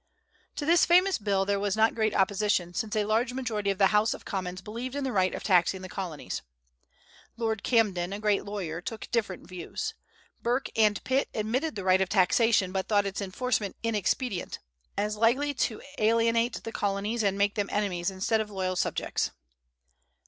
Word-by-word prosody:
To 290 - -3
this 335 +2 +5
famous 365 +1 +4
bill 200 -2 +1
there 200 0 +1
was 205 +1 -1
not 220 +1 +4
great 220 -2 0
opposition, 195 -2 +1
since 215 +2 -2
a 210 -1 +1
large 230 +3 +1
majority 225 -6 -2
of 195 - 0
the 195 +1 +4
House 210 +1 +3
of - - -13
Commons 185 -2 -4
believed 235 +7 -6
in 285 - -2
the 265 - -1
right 185 -4 +1
of - - -6
taxing 185 0 +3
the - - -5
Colonies. 175 -7 -5 1.0
Lord 220 -3 -1
Camden, 195 -7 +2
a 200 - -3
great 210 -2 +1
lawyer, 180 -5 -4
took 220 +4 -7
different 205 -8 -2
views. 180 -2 -5 0.5
Burke 245 +3 0
and 215 -2 +3
Pitt 265 +2 +1
admitted 235 +7 -1
the 200 - -4
right 185 0 +4
of 190 - +1
taxation, 200 0 +3
but 190 0 -2
thought 205 -2 +3
its 195 +1 -3
enforcement 205 +1 -1
inexpedient, 215 -1 -1 0.4
as 210 +1 -1
likely 260 +6 +2
to 230 -4 -2 0.2
alienate 230 +2 +2
the 225 - -5
Colonies 205 +2 -1
and 200 -1 +1
make 200 0 +2
them 205 -2 -2
enemies 190 -4 0
instead 195 +4 0
of 215 - -5
loyal 185 -2 -2
subjects. - - -1
210 Hz, 180 wpm, -28 LUFS, 190-230 Hz, 1.0 s, this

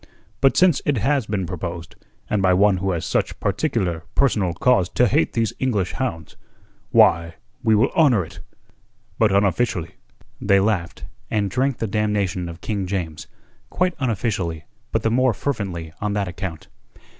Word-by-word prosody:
But 135 -2 +3
since 180 -5 +4
it 145 -3 +1
has 130 +1 +1
been 100 -3 -1
proposed, 85 -1 -6 0.3
and 105 - 0
by 95 -1 +4
one 100 0 +4
who 95 +1 -2
has 85 -3 -2
such - - -1
particular 85 -3 -1
personal 105 -10 +2
cause 95 -1 +2
to 125 - +3
hate 80 -5 +1
these 115 -2 0
English 105 -9 0
hounds, 80 - -4 0.5
why, 85 -1 +4 0.3
we 110 -1 +4
will 105 - +3
honour 125 - +3
it - - -13 0.8
but 110 -3 +4
unofficially." 100 -2 +1 0.5
They 100 -1 +4
laughed, 95 -4 -1 0.3
and 100 -3 0
drank 130 +3 0
the - - -2
damnation 100 -4 -1
of 85 0 -10
King 100 -4 -2
James 85 -5 -4 0.4
quite 180 0 0
unofficially, 100 - -2 0.3
but - - 0
the 115 - +1
more 125 -1 +3
fervently 95 - -3
on 105 0 -1
that 100 -2 -1
account. 90 -2 -6
100 Hz, 155 wpm, -22 LUFS, 90-115 Hz, 0.8 s, since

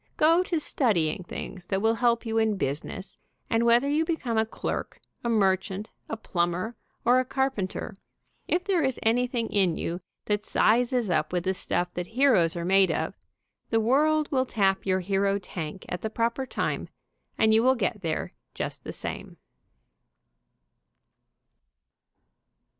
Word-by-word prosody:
Go 330 +3 +5
to 350 -3 -1
studying 185 - +1
things 180 0 -7
that 195 - 0
will 225 +2 +3
help 235 0 +1
you 225 0 0
in 220 -2 +1
business, 150 +5 -4 0.3
and 230 +1 +3
whether 240 +4 +5
you 300 +3 +2
become 320 -8 -2
a 220 0 +2
clerk, - - -4 0.2
a 235 - -1
merchant, 195 -1 +1 0.2
a 225 - -3
plumber 180 +2 -1 0.3
or 245 +2 +5
a - - +2
carpenter, 260 -7 -2 0.5
if 355 +1 +1
there 380 -3 +1
is 265 -3 0
anything 240 +1 +1
in 185 -5 +2
you 175 +2 -3 0.2
that 210 0 0
sizes 240 -1 +2
up 155 -2 +1
with 180 -1 -1
the 190 0 +1
stuff 175 -1 -2
that 180 0 -4
heroes 215 -13 +4
are 170 0 -3
made 195 +1 +5
of, - - -1 0.6
the 225 - +2
world 300 +6 +2
will 260 -2 +1
tap 195 -4 +1
your 185 0 +2
hero 195 +1 +1
tank 180 -2 -6
at 180 - -4
the 220 - -2
proper 235 +4 -1
time, - - -2 0.5
and 220 0 +4
you 220 - +5
will 260 +2 +4
get 210 -2 -1
there 160 -3 -3 0.2
just - - -4
the - - -6
same. - - -6
220 Hz, 155 wpm, -27 LUFS, 190-250 Hz, 0.6 s, Go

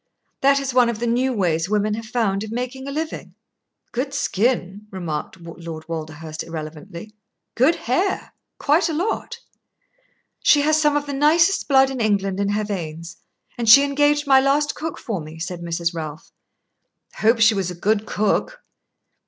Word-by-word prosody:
That 275 +1 +4
is 275 -2 -3
one 250 -2 +4
of 235 - -3
the 235 - -3
new 245 +3 +1
ways 175 -6 0
women 210 0 +1
have 225 +1 -5
found 215 -4 0
of 220 - -7
making 250 +3 -4
a - - -4
living." 315 +2 -5 0.6
"Good 270 +3 -3
skin," 210 -5 -1
remarked 175 -4 -5
Lord 165 -1 -9
Walderhurst, 155 -1 -6
irrelevantly. 165 +5 -8 0.4
"Good 270 +8 +3
hair 360 +11 -1 0.2
quite 315 +5 +2
a - - -2
lot." 440 +6 -2 1.0
"She 290 - +5
has 310 +1 +3
some 295 -1 +3
of 290 - -2
the 285 - -5
nicest 325 +7 +3
blood 270 -1 +4
in 260 -3 -4
England 200 -3 0
in 200 0 0
her 210 +1 0
veins, 170 -4 -6 0.4
and 230 -2 +1
she 275 +5 +10
engaged 290 +1 +2
my 270 -1 +6
last 285 +2 +2
cook 320 0 -5
for 205 -7 -4
me," 155 +1 -10
said 175 +1 -5
Mrs. 170 0 -2
Ralph. 155 -2 -7 0.9
"Hope 230 +2 +3
she 225 0 +6
was 195 -3 -1
a 180 - -6
good 210 +4 0
cook." 215 - -1
220 Hz, 170 wpm, -22 LUFS, 175-275 Hz, 1.0 s, she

